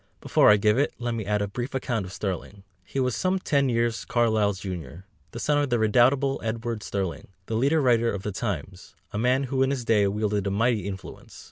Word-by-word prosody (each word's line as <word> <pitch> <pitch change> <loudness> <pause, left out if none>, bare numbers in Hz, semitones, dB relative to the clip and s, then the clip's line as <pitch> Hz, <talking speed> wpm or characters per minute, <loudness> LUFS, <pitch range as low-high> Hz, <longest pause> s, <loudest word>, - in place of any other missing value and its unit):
Before - - +4
I 105 - +7
give 105 +4 +2
it, 145 - 0
let 120 -1 -3
me 110 -3 -4
add 105 0 +1
a - - -2
brief 120 +6 -5
account 120 -6 -2
of - - -10
Sterling. 95 0 -5 0.2
He 135 - -4
was 125 -3 +1
some 185 +1 +1
ten 140 -7 +1
years 115 -1 0
Carlyle's 110 -4 +1
junior, 90 -2 -7 0.2
the 115 - -8
son 145 +3 +1
of 145 -2 0
the 120 - +2
redoubtable 130 +5 +3
Edward 115 0 -3
Sterling, 95 -4 -4 0.2
the 115 - -5
leader 140 +8 +2
writer 120 -2 +3
of 100 -1 -5
the 105 - -3
Times, 95 - -5 0.2
a 105 - -2
man 125 +4 +2
who 135 0 -1
in 135 - +3
his 135 -4 -2
day 105 -3 +3
wielded 105 0 -1
a - - +1
mighty 105 0 +1
influence. 95 -1 -9
115 Hz, 220 wpm, -26 LUFS, 100-125 Hz, 0.2 s, I